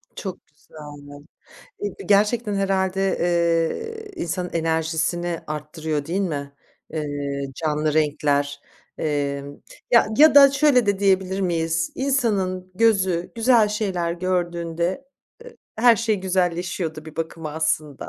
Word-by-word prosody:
Çok 190 -3 -7
güzel, 145 +1 -20
anladım. 145 0 -11 0.5
Eee, 205 -1 -3
gerçekten 210 +1 +2
herhâlde, 195 -1 0
eee, 175 - 0
insanın 180 +1 -3
enerjisini 165 +1 -1
arttırıyor 150 0 -4
değil 185 +4 -1
mi, 140 -6 -3 0.4
eee, 145 -2 -3
canlı 150 -1 -1
renkler? 145 -2 0 0.4
Emm, 145 -2 -3 0.3
ya, 235 -3 +6
ya 310 0 +7
da 275 -1 +9
şöyle 275 -5 +3
de 200 -1 +1
diyebilir 190 -1 +1
miyiz? 165 -2 -1
İnsanın 200 -9 -1
gözü 190 -5 +2
güzel 230 -2 +4
şeyler 190 -6 -1
gördüğünde, 175 +3 -2 0.4
ııı, - - -11 0.2
her 235 0 +5
şey 225 -1 0
güzelleşiyor 180 -2 -1
da 155 0 -10
bir 160 - -12
bakıma 160 -1 -5
aslında. 155 -3 -2
175 Hz, 120 wpm, -23 LUFS, 155-200 Hz, 0.5 s, da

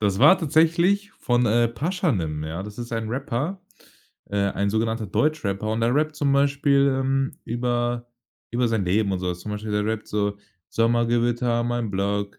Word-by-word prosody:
Das 100 -2 +1
war 190 - +7
tatsächlich 170 +6 +2
von, 120 - +1
äh, 120 +2 +3
„Pashanim“, 115 - -1
ja? 80 +4 -4
Das 105 +3 -9
ist 120 0 -6
ein 115 -1 -2
Rapper 140 - -3 0.7
äh, 100 - -1
ein 100 0 0
sogenannter 110 0 -1
Deutschrapper 110 -5 0
und 115 - -1
der 120 +3 +2
rappt 155 +1 +1
zum 140 -2 +1
Beispiel, 140 -1 +3
ähm, 135 0 -1
über 120 0 -1 0.4
über 120 +1 +1
sein 110 -4 0
Leben 100 +3 +1
und 95 - -2
so 90 - -2
was. 90 - -6
Zum 105 +3 -6
Beispiel 105 +1 -5
der 105 0 0
rappt 110 -1 -2
so: 105 -1 -1 0.3
„Sommergewitter, 120 +1 +1
mein 120 -2 -2
Block. 100 +1 -2
120 Hz, 175 wpm, -24 LUFS, 105-140 Hz, 0.7 s, war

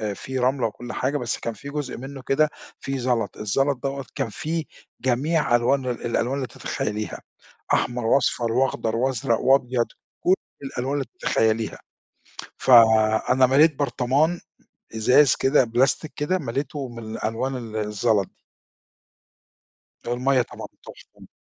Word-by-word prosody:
فيه 130 +4 -5
رملة 125 -1 +1
وكل 120 +3 -8
حاجة، 140 +3 -1
بس 120 -4 -2
كان 115 - -4
في 140 - -9
جزء 145 -3 -4
منه 135 +1 -8
كده 150 +4 +2 0.3
فيه 135 0 -3
زلط، 120 -5 -1
الزلط 135 +6 0
دوّة 135 0 -3
كان 115 - -2
فيه 160 +8 -3 0.4
جميع 130 +2 +1
ألوان 130 +3 +2
ال 125 -2 -3
الألوان 120 +3 0
اللي 135 -3 -3
تتخيليها، 105 0 -4 0.5
أحمر 120 -1 0
وأصفر 120 -2 +2
وأخضر 120 -3 0
وأزرق 125 -1 0
وأبيض، 125 -2 +3 0.3
كل 180 - +3 0.3
الألوان 135 0 -3
اللي 145 -2 -1
تتخيليها، 110 0 +1 0.8
فأنا 115 +1 +5
مَليت 145 +5 +5
برطمان، 145 +5 +1 0.6
إزاز 125 +5 +5
كده، 135 0 +3
بلاستيك 130 +6 0
كده، 155 +6 0
مَليته 140 0 -4
من 115 -1 -9
الألوان 115 +5 -2
ال 115 -3 -8
الزلط 105 -1 +1
دي. - - -34 1.7
المَيَّة 125 +2 +2
طبعًا - - -8 0.2
تحفة. - - -15
130 Hz, 130 wpm, -24 LUFS, 115-140 Hz, 1.7 s, فأنا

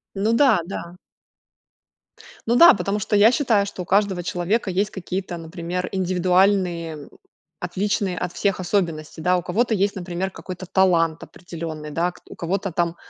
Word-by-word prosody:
Ну 210 +4 +1
да, 235 -6 +4
да. 175 -1 -7 1.5
Ну 235 - +2
да, 340 +7 +9
потому 200 +1 -2
что 210 - -1
я 210 +3 +6
считаю, 235 -6 +2
что 200 -2 -7
у 180 - -6
каждого 195 -2 +1
человека 185 +6 -1
есть 200 +3 0
какие-то, 185 -1 -5
например, 170 +2 -5
индивидуальные, 185 -2 +1
м, 145 -2 -10 0.5
отличные 190 +1 -1
от 180 +1 -3
всех, 195 0 -1
особенности, 170 -5 -2
да, 180 +3 +2
у - - -2
кого-то 225 +6 0
есть, 200 0 +1
например, 185 +1 -4
какой-то 185 0 -8
талант 170 -4 +2
определенный, 160 -4 -8
да. 170 +4 0
Кт - - -20
у - - -10
кого-то 190 +2 -2
там 170 0 -1
185 Hz, 160 wpm, -22 LUFS, 175-200 Hz, 1.5 s, да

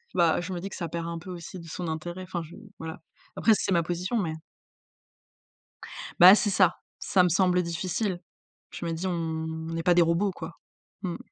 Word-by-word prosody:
bah, 170 -1 +3
je 185 +2 -5
me 175 - -3
dis 195 - -5
que - - -8
ça 170 - -3
perd 170 +1 -4
un 170 0 -4
peu 180 - -11
aussi 180 +1 -7
de 165 - -11
son 170 +1 -5
intérêt. 175 +3 -4
Enfin, 180 -1 -4
je 160 - -12 0.2
voilà. 160 +1 -6 0.4
Après, 225 - +3
c'est 195 - -1
ma 170 -2 +3
position, 180 +7 -2
mais 175 -7 -1 1.9
Bah, 185 +3 +11
c'est 210 -1 +1
ça. 185 -3 +4 0.2
Ça 185 -2 +3
me 180 - +3
semble 180 +1 +3
difficile. 175 +3 -2 0.5
Je 170 - -6
me 165 - -1
dis: 170 +3 -3
«On 160 -2 -3
on 165 - -3
est 165 - -2
pas 175 - +5
des 175 - +5
robots 170 +4 +2
quoi». - - -9 0.4
Mmh. 175 -3 -2
175 Hz, 205 wpm, -27 LUFS, 165-185 Hz, 1.9 s, Bah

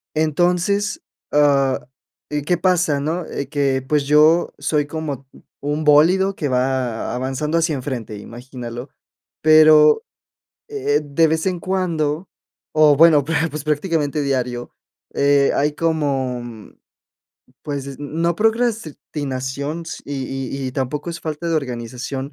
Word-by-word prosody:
entonces, 180 +7 +1 0.3
ah, 140 -3 +3 0.5
eh 150 -1 -2
¿qué 175 +4 +1
pasa?, 175 -4 +2
¿no? 160 +5 -2
Eh 140 -1 -5
que, 140 -3 0
pues, 150 -1 +2
yo 155 +4 +4
soy 150 -2 0
como 145 -3 -5 0.4
un 150 +2 -1
bólido 175 +6 +4
que 150 - -2
va 125 -3 -1
avanzando 135 +5 -2
hacia 165 -1 +1
enfrente, 125 -6 -5
imagínalo. 120 +2 -8 0.5
Pero, 155 - +6 0.7
eh, 415 - 0
de 155 +3 +2
vez 160 +2 -1
en 185 -2 0
cuando, 170 -3 -1 0.4
o 155 -2 +5
bueno, 155 -2 +6
pues 160 +2 0
pues 150 0 -6
prácticamente 150 -1 0
diario, 125 -3 -2 0.4
eh, 140 0 +3
hay 150 +1 +1
como, 140 -6 -1 1.2
pues, 140 -2 -5
no 165 +4 -1
procrastinación 155 - -2 0.2
y 145 - -5 0.5
y - - -1
y - - -7
tampoco 145 +5 -3
es 170 0 -7
falta 160 +2 -4
de 165 - 0
organización. 125 +1 -5
150 Hz, 125 wpm, -20 LUFS, 135-165 Hz, 1.2 s, Pero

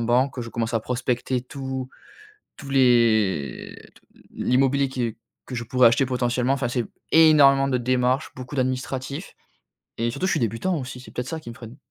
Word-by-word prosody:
banque, 125 +4 +1
que 125 - -4
je 115 - -7
commence 115 0 -3
à 115 - +2
prospecter 125 +1 -2
tous 130 0 -6 0.7
tous 140 - -9
les 115 - +2 0.2
t - - -21 0.3
l'immobilier 135 +2 +1
qui 120 -4 -3 0.3
que 130 - -7
je 120 - -3
pourrais 125 0 +5
acheter 125 +3 +2
potentiellement. 125 0 0
Enfin, 135 -3 -1
c'est 120 -1 -1 0.3
énormément 145 -4 +6
de 130 - +1
démarches, 125 +3 0
beaucoup 130 +2 -8
d'administratif 130 +4 -3 0.6
et 115 +1 -1
surtout 180 +10 -2
je 190 - +1
suis - - 0
débutant 120 - -1
aussi, 130 -1 -7
c'est 130 - -13
peut-être 125 +1 -4
ça 160 -1 -4
qui 120 - -11
me - - -9
freine. 115 +1 -11
125 Hz, 180 wpm, -24 LUFS, 120-135 Hz, 0.7 s, énormément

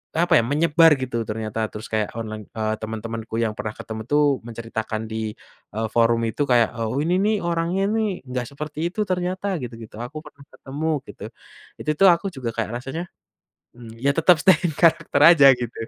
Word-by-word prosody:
apa 170 +2 +4
ya, - - +1
menyebar 160 +2 +5
gitu 115 -3 -2
ternyata 110 0 -3
terus 105 +1 -8
kayak 110 -1 -1
online 110 -2 -6
eee, 110 -1 -1
temen-temanku 110 0 -6
yang 115 -2 +1
pernah 105 0 -4
ketemu 110 0 -7
tuh 150 0 +4 0.2
menceritakan 110 -1 -5
di, 110 -1 -3 0.4
eee, 110 0 -1
forum 115 0 +3
itu 130 +7 -1
kayak, 120 -3 +4 0.3
"Ini 170 +4 +1
nih 215 +1 +2
orangnya 170 +3 0
nih 215 -4 -1
enggak 125 -1 -3
seperti 150 +3 -4
itu 215 - 0
ternyata," 185 +2 -2
gitu-gitu, 115 -3 -9
"Aku 130 +6 -6
pernah 140 - -15
ketemu," 150 +4 -4 0.2
gitu, - - -9 0.6
itu 155 - 0
tuh 195 - +7
aku 170 +4 -2
juga 125 -5 -5
kayak 115 +1 -2
rasanya, 160 +8 -6 0.6
mmm, 115 -2 -12
ya 140 - +4
tetap 165 +3 +5
stay 190 - +7
in 160 - -5
character 165 -3 +2
aja 155 -5 +8
gitu 120 -1 -5
125 Hz, 180 wpm, -23 LUFS, 110-165 Hz, 0.6 s, aja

